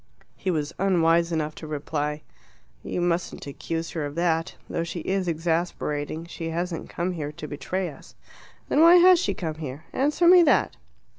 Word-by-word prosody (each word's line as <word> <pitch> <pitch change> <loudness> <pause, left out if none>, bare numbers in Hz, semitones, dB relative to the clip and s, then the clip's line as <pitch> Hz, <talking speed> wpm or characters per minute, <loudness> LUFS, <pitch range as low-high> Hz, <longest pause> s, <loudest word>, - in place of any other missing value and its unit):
He 190 - -3
was 155 -2 -1
unwise 170 -3 +3
enough 155 -2 -1
to 155 - -9
reply, 150 0 -3 0.6
"You 180 - -3
mustn't 175 0 -1
accuse 165 +3 -4
her 160 - -3
of 145 0 -5
that. 165 0 0
Though 165 - -2
she 170 0 -5
is 190 +2 -1
exasperating, 160 -2 -2
she 170 -1 -6
hasn't 170 0 -3
come 175 +2 -2
here 150 -4 -4
to 150 - -8
betray 180 +6 -3
us." 150 - -12 0.5
"Then 295 - +3
why 335 +2 +8
has 360 0 +7
she - - -1
come 160 -3 -4
here? 140 +1 -6
Answer 300 +6 +2
me 360 0 +9
that." 335 - +3
165 Hz, 170 wpm, -25 LUFS, 155-180 Hz, 0.6 s, me